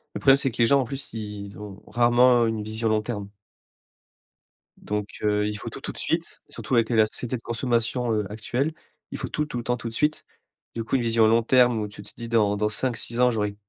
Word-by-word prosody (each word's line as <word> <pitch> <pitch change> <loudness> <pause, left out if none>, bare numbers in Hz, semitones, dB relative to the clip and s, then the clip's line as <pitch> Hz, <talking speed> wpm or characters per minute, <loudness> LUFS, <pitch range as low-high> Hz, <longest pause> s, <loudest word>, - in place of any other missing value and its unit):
Le - - -2
problème, 135 0 +6
c'est 135 - +1
que 115 - -10
les 120 - +6
gens, 140 +4 +4
en - - -2
plus, 135 +3 -5
ils, 105 -2 -7
ont 105 -1 -10
rarement 120 0 +4
une 110 -1 -2
vision 110 +2 -2
long 110 0 +2
terme 105 -3 -5 1.5
donc, 105 -1 -3 0.2
heu, 105 0 +2
il 105 0 -3
faut - - -6
tout, - - -9
tout - - -4
de - - -13
suite, - - -2
surtout 130 - -3
avec 115 -1 +3
le 120 - 0
la 110 - +6
société 125 +3 -3
de - - -14
consommation, 120 0 0
heu, 105 -1 0
actuelle. 125 +8 -2 0.4
Il - - -4
faut - - -4
tout, 150 - -1
tout 150 - -6
le 120 - -4
temps, 125 +1 0
tout 115 - -6
de - - -10
suite. 150 +5 0 0.5
Du 115 - -2
coup, 115 - -1
une 130 - +2
vision 115 -1 +3
long 115 +1 +4
terme 125 -1 +4
où 105 - -2
tu 100 0 -11
te 105 - -9
dis: 115 - -7
«Dans 105 -3 +2
dans 105 +1 +1
5-6 120 +1 -1
ans, 125 0 +5
j'aurais 105 -3 -2
115 Hz, 245 wpm, -25 LUFS, 105-125 Hz, 1.5 s, problème